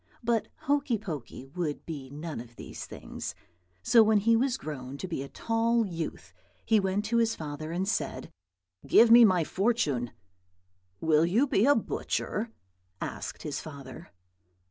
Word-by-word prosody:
But 230 -1 +1
Hokey 280 -4 +1
Pokey 150 - -7
would 150 +1 -4
be 145 -5 -6
none 150 0 -6
of 120 0 -11
these - - -8
things; - - -7 0.5
so 230 - +6
when 220 0 +5
he 230 +3 +4
was 255 +2 +1
grown 140 - -6
to 185 - -5
be 165 -6 -3
a 140 - -7
tall 230 0 +1
youth 170 -4 -5 0.3
he 220 -1 +4
went 195 +1 0
to 235 +2 +1
his 230 -1 +2
father 155 0 -6
and 185 +3 -1
said, 220 - -2 0.6
"Give 230 0 +6
me 235 +1 +10
my 185 -6 +5
fortune." 155 - 0 0.9
"'Will 160 0 +4
you 225 +11 +3
be 245 -3 +2
a 285 - +6
butcher?' 230 -4 -2 0.5
asked - - -5
his 145 -3 -3
father. 140 -5 -10
185 Hz, 155 wpm, -29 LUFS, 150-230 Hz, 0.9 s, me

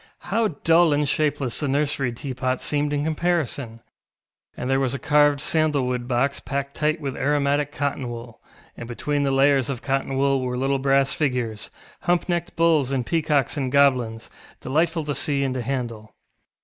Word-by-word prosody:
How 225 -1 +2 0.2
dull 165 -1 +5
and 145 0 +1
shapeless 140 -4 0
the 145 - -1
nursery 140 -2 0
teapot 130 0 -3
seemed 145 0 -1
in 145 0 0
comparison! 155 -7 -1 0.8
And 125 - -4
there 135 +1 +2
was 135 -1 0
a - - -2
carved 145 0 +3
sandal 155 -3 +1
wood 125 -1 -2
box 135 +3 0
packed 140 0 -4
tight 155 +1 0
with 140 -4 -4
aromatic 145 0 +1
cotton 140 -3 -2
wool, 120 -1 -9 0.3
and 120 - -8
between 145 +5 -2
the 140 - +1
layers 135 -1 +3
of 130 -4 -4
cotton 135 -1 -1
wool 135 -1 +2
were 125 -1 -2
little 135 +1 0
brass 135 0 +2
figures, 125 -7 -2 0.3
hump 175 0 0
necked 175 -1 -2
bulls, 160 -5 +3
and 130 -3 -1
peacocks 150 -5 +1
and 130 -3 -1
goblins, 125 -5 +2 0.3
delightful 160 +4 0
to 145 -1 -2
see 140 +1 0
and 135 -2 -1
to 130 - -3
handle. 120 -4 -4
140 Hz, 175 wpm, -23 LUFS, 130-150 Hz, 0.8 s, dull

